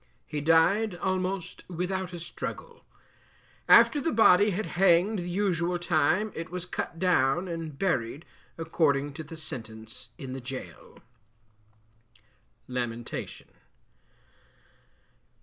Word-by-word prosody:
He 150 -2 -4
died 175 +7 +3
almost 185 0 -2
without 185 +1 -3
a 175 - -7
struggle. 470 - -7 0.9
After 295 - +7
the 325 - 0
body 210 -3 +6
had 205 +2 -2
hanged 185 +3 +3
the 175 0 -4
usual 175 -2 0
time 175 +5 +1
it 165 0 -6
was 180 0 -5
cut 175 - -4
down 175 -1 +2
and 165 -4 -5
buried 145 -5 -1 0.3
according 145 -4 +1
to 160 - -7
the 160 +2 -10
sentence, 110 -7 -7
in 135 -5 -7
the 135 - -6
gaol. 125 - -9 1.7
LAMENTATION. 120 -2 -5
170 Hz, 110 wpm, -28 LUFS, 145-185 Hz, 1.7 s, After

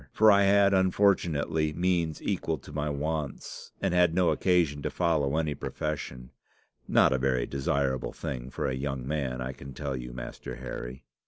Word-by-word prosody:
For 110 0 +6
I 100 0 +5
had 100 0 +5
unfortunately 85 -5 +2
means 85 -2 0
equal - - -1
to - - -13
my 75 0 -1
wants, 75 0 -4
and - - +1
had 90 -2 +4
no 90 -1 +4
occasion 85 -6 +2
to - - -2
follow 80 -4 +1
any 80 -2 0
profession 70 -5 -5 0.6
not - - +5
a 65 - +1
very 65 -2 +1
desirable 70 -1 -1
thing 60 0 -5
for - - -4
a 65 - -1
young 65 -1 -3
man, 65 -4 -2
I 65 +1 -3
can 70 0 -10
tell 70 -3 -3
you, 60 -1 -6
Master - - -7
Harry. 60 +2 -7
75 Hz, 170 wpm, -28 LUFS, 65-85 Hz, 0.6 s, For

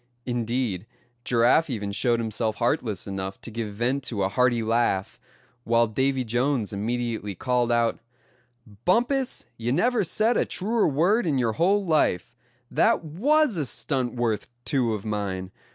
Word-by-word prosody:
Indeed, 120 -4 -2 0.4
Giraffe 125 +7 +3
even 105 -5 -3
showed 120 +3 +1
himself 110 -1 -1
heartless 110 -3 -1
enough 95 -1 -5
to 115 - -4
give 110 -1 -4
vent 125 +5 0
to 105 -7 -1
a 95 - +1
hearty 120 +1 +2
laugh; 110 -4 0 0.4
while 115 0 +3
Davy 130 +4 0
Jones 120 -1 0
immediately 110 -1 -2
called 125 +3 0
out: 115 -1 +1 0.8
"Bumpus, 245 +7 +1
you 115 +1 -2
never 235 - +2
said 220 +7 +2
a - - +2
truer 220 +4 0
word 175 - +2
in 145 -4 +1
your 115 -3 +1
whole 195 - +2
life; 155 - +1 0.4
that - - +3
was 255 - +2
a 150 - 0
stunt 130 -3 -1
worth 115 -4 -1 0.2
two 125 -6 +1
of 105 - -8
mine. 100 -3 -3
120 Hz, 150 wpm, -25 LUFS, 110-145 Hz, 0.8 s, Giraffe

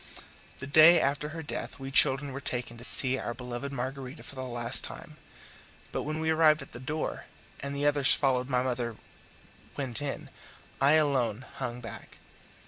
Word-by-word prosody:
The 130 - -7
day 155 +4 +7
after 145 +2 0
her 160 +1 -6
death 145 - -5
we 135 -1 -7
children 135 +1 +3
were 140 - -5
taken 120 -2 -1
to 115 - -12
see 130 +1 +3
our 120 - -4
beloved 125 +2 -5
Margarita 135 +1 -5
for - - -11
the 130 - -6
last 120 -1 +1
time; - - -6 0.7
but - - -2
when 155 +1 -3
we 160 0 +1
arrived 155 -1 +4
at - - -15
the 120 - -9
door, 150 +5 -4 0.3
and 140 0 -5
the 145 +1 -1
others 145 -2 +4
following 130 -2 +1
my 125 -1 +2
mother 120 -3 -2 0.8
went 130 -2 -3
in, 145 -2 -5 0.5
I 140 +2 +6
alone 130 -6 +2
hung 120 0 -4
back. 115 - -9
135 Hz, 175 wpm, -29 LUFS, 125-145 Hz, 0.8 s, day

